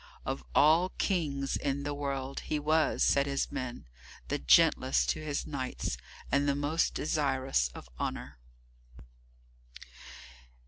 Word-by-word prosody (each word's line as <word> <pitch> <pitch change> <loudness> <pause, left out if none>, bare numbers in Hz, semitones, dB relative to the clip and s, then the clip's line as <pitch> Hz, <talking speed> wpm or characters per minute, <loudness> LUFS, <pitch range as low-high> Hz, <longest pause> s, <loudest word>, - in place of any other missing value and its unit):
Of 70 - -3
all 160 +5 +5
Kings 145 -8 0
in 140 0 -2
the 145 0 -2
world, 140 -1 -3
he 155 - -2
was, 155 +2 +2
said 140 0 +3
his 140 0 -1
men, 125 -1 -5 0.4
the - - -1
gentlest 60 0 +4
to - - -5
his 145 -2 -2
knights 130 - -3 0.4
and 140 +1 +2
the 140 - +2
most 145 +4 0
desirous 135 - 0
of - - -10
honour. - - -4
140 Hz, 125 wpm, -30 LUFS, 135-150 Hz, 0.4 s, all